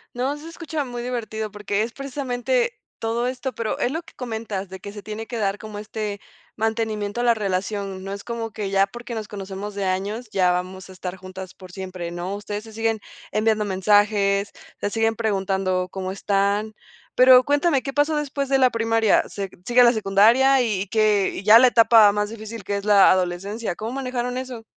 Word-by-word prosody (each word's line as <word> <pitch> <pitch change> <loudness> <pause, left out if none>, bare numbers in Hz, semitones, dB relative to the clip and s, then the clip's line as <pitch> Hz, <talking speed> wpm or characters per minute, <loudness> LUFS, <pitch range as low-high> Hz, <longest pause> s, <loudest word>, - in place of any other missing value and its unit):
No, 265 +4 -1
sí 295 - -13
se 330 - -8
escucha 320 -2 -4
muy 240 -1 -6
divertido 220 -3 -4
porque 205 0 -1
es 230 - -4
precisamente 275 - -1 0.3
todo 230 +2 -1
esto, 255 0 -4
pero 220 -1 -3
es 245 - 0
lo 325 +4 -3
que - - -18
comentas, 220 -5 -5
de 190 0 -8
que 200 - -8
se 205 -1 -10
tiene 215 +1 -6
que 235 - -5
dar 200 -1 -1
como 215 -1 -8
este 210 -1 -5 0.4
mantenimiento 220 0 -1
a - - -1
la 235 -1 +4
relación. 195 -1 -3
No 195 - -6
es 200 - -7
como 230 -2 -4
que 200 -2 -4
ya 195 0 +3
porque 240 +3 -8
nos 220 -2 -4
conocemos 200 0 -7
de 200 -1 -2
años, 205 +5 -2
ya 180 -2 +3
vamos 185 +1 -4
a 190 - -10
estar 180 0 -6
juntas 185 0 -9
por 185 -1 -13
siempre, 185 -2 -6
¿no? 175 +2 -4
Ustedes 205 +1 -5
se 220 -1 -12
siguen 225 0 0 0.3
enviando 215 0 +1
mensajes, 200 +1 +2 0.3
se 205 - -1
siguen 225 +1 +1
preguntando 190 -4 0
cómo 190 -1 -4
están. 200 +2 0 0.4
Pero 255 0 +7
cuéntame, 290 0 +2
¿qué 275 - -4
pasó 295 +2 +2
después 280 -1 -2
de 270 - +4
la 255 - +5
primaria? 225 -1 +2
se 195 -2 -5 0.2
sigue 245 +1 +5
la 240 - +7
secundaria 230 +6 +4
y 205 -4 -1
que 210 -2 +2
y 195 - -6
ya 215 +3 +8
la 255 - +7
etapa 225 -3 +6
más 210 0 -1
difícil, 220 0 -8
que 200 +2 -2
es 200 - -6
la 205 -2 +7
adolescencia. 185 +3 -1
¿Cómo 220 +5 -5
manejaron 250 -1 -3
eso? 255 -3 -6
215 Hz, 200 wpm, -23 LUFS, 195-240 Hz, 0.4 s, ya